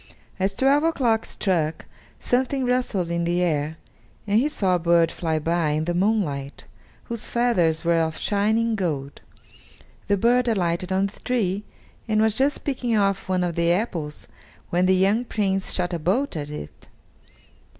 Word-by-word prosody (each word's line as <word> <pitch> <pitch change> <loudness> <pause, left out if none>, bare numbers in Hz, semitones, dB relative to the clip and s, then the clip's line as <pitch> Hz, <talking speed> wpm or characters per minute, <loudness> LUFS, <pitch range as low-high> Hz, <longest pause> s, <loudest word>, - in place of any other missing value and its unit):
As 195 +1 0
twelve 275 +5 +3
o'clock 245 -9 +1
struck, 165 -5 -1 0.3
something 260 +1 0
rustled 245 -8 0
in 170 0 0
the 175 +1 +1
air, 155 -2 -1 0.5
and 210 +1 +3
he 285 +5 +1
saw 195 -11 +1
a 180 - +2
bird 170 0 +3
fly 160 -2 -2
by 165 +1 0
in 155 +1 -1
the 175 - -1
moonlight, 175 -8 -1 0.4
whose 235 -2 -4
feathers 180 -10 +1
were 170 0 +3
of 160 -1 -1
shining 220 +3 +1
gold. 150 -8 -3 0.9
The 200 - +2
bird 245 +4 +3
alighted 180 -4 0
on 190 +1 +2
the 200 - -7
tree 210 -5 -1 0.4
and 215 -1 +1
was 220 0 +3
just 275 +5 0
picking 245 -5 -1
off 195 -2 0
one 185 -1 +1
of 175 -1 -1
the 170 +1 +2
apples 175 -6 -2 0.5
when 180 +1 +2
the 190 - +4
young 200 +5 +2
Prince 195 -5 -1
shot 180 -1 -1
a 170 - -2
bolt 195 - 0
at 145 -2 -4
it. 150 - -9
190 Hz, 165 wpm, -24 LUFS, 170-225 Hz, 0.9 s, the